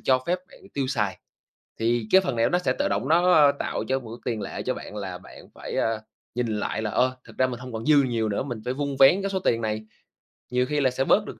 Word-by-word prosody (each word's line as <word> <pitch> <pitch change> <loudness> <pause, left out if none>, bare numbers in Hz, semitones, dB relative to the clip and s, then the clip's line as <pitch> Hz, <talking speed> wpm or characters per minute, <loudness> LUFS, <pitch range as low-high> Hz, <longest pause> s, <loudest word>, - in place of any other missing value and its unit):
cho 130 -1 +3
phép 180 +1 +1
bạn - - -16
tiêu 140 -2 0
xài. 105 -7 -1 0.6
Thì 115 -1 +1
cái 190 - +7
phần 160 -10 -2
này 115 - +2
nó 175 - +2
sẽ 130 -7 0
tự - - +2
động - - -1
nó, 175 +2 +5
a, 145 -3 +7
tạo - - -2
cho 135 0 +1
một 115 -4 -11
cái - - -16
tiền 105 - -5
lệ - - -5
cho - - 0
bạn 105 - -9
là 95 -3 -5
bạn 90 - -14
phải, - - -6
a, 110 -1 0 0.3
nhìn 125 -1 0
lại 110 - -2
là, 105 - -2
ờ, 130 0 +2
thực - - -16
ra 130 - +3
mình 120 -1 -5
hông 125 -2 -8
còn 110 +1 -5
dư 145 -2 +6
nhiều 115 -4 0
nữa, 100 - -1
mình 120 -5 -5
phải 125 - -1
vun 140 0 -2
vén 175 +9 +7
cái 195 - -1
số 190 - 0
tiền 115 -10 +1
này, 110 -1 -2 0.7
nhiều 125 0 +2
khi 150 +2 -1
là 130 - +4
sẽ 130 +1 0
bớt 210 - +4
được. - - -8
125 Hz, 280 wpm, -25 LUFS, 115-145 Hz, 0.7 s, cái